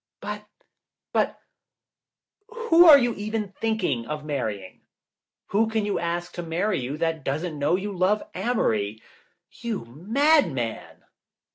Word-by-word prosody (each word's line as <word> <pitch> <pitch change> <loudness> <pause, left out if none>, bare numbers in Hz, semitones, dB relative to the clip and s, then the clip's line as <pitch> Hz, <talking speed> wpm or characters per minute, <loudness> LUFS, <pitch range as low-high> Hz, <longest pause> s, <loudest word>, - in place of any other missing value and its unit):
"But - - -6 0.3
— - - -65
but, - - +1 1.1
who 450 -8 +4
are 300 -3 +11
you 240 -3 +1
even 215 0 -3
thinking 190 - -1
of 150 0 -5
marrying? 110 -10 -4 0.7
Who 220 +2 +2
can 220 -2 0
you 205 - -1
ask 175 +1 -3
to 175 - -5
marry 175 +5 -1
you 135 +4 -4
that 165 -2 -1
doesn't 155 +3 -3
know 145 +4 +2
you 200 +2 -3
love 190 +4 +2
Amory? 110 - 0 0.5
You 230 - -5
mad 250 - +2
man!" 120 -4 -5
180 Hz, 135 wpm, -25 LUFS, 145-225 Hz, 1.1 s, are